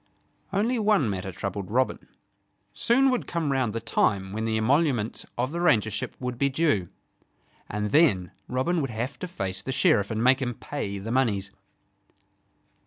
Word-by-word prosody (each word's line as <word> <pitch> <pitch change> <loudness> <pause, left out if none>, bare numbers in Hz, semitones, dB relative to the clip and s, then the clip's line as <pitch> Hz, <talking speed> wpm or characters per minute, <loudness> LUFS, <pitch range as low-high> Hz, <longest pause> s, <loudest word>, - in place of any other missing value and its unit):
Only 225 +5 +1
one 205 - +3
matter 95 0 -4
troubled 100 +1 -5
Robin. 130 +4 0 0.7
Soon 265 +3 +3
would 250 - -1
come 165 -4 -1
round 130 -4 +1
the 115 - -3
time 95 -3 0
when 110 +1 -2
the 110 -1 0
emoluments 125 -1 +1
of 125 +3 -1
the 170 - -3
Rangership 120 - +1
would 125 -1 -4
be 140 - +3
due; 135 - +1 0.8
and 105 0 -2
then 105 - +4 0.2
Robin 155 +7 0
would 135 - -2
have 120 +4 -4
to 180 - -4
face 95 - -4
the 130 - -4
Sheriff 135 - +3
and 110 0 -1
make 130 +2 +4
him 125 -2 -2
pay 100 -9 -5
the 105 +4 -5
moneys. 105 -7 +1
125 Hz, 165 wpm, -26 LUFS, 105-150 Hz, 0.8 s, then